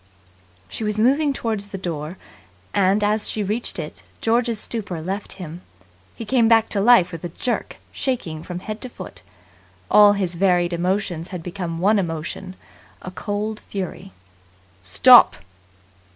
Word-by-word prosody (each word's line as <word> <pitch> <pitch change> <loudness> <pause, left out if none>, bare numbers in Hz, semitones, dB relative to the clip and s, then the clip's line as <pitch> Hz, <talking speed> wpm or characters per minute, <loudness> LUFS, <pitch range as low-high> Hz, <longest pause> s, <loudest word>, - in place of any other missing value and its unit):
She 220 - -5
was 210 0 -1
moving 280 +7 +3
toward 225 -5 -2
the 200 0 -7
door; 170 -2 -5 0.6
and, 200 +1 +2
as 210 +1 +2
she 215 - -2
reached 215 +5 -2
it, 155 -3 -7 0.2
George's 230 -1 +1
stupor 205 -7 -4
left 190 +5 -4
him. 175 -2 -8 0.5
He 230 - -7
came 235 0 +3
back 225 -1 +4
to 200 - 0
life 210 -5 +5
with 165 -2 -8
a 175 - -4
jerk, 240 +9 -3
shaking 205 - -3
from 175 +2 -7
head 215 +2 -6
to 255 - -4
foot. 185 -6 -10 0.7
All 205 -1 +7
his 190 -3 -2
varied 175 -1 +2
emotions 180 -1 -1
had 180 -3 -7
become 175 -2 -5
one 205 +5 +3
emotion 175 +2 -4 0.5
a 185 - -6
cold 210 +3 -4
fury. 195 0 -6 0.7
"Stop!" 95 -1 +7
195 Hz, 150 wpm, -22 LUFS, 175-215 Hz, 0.7 s, All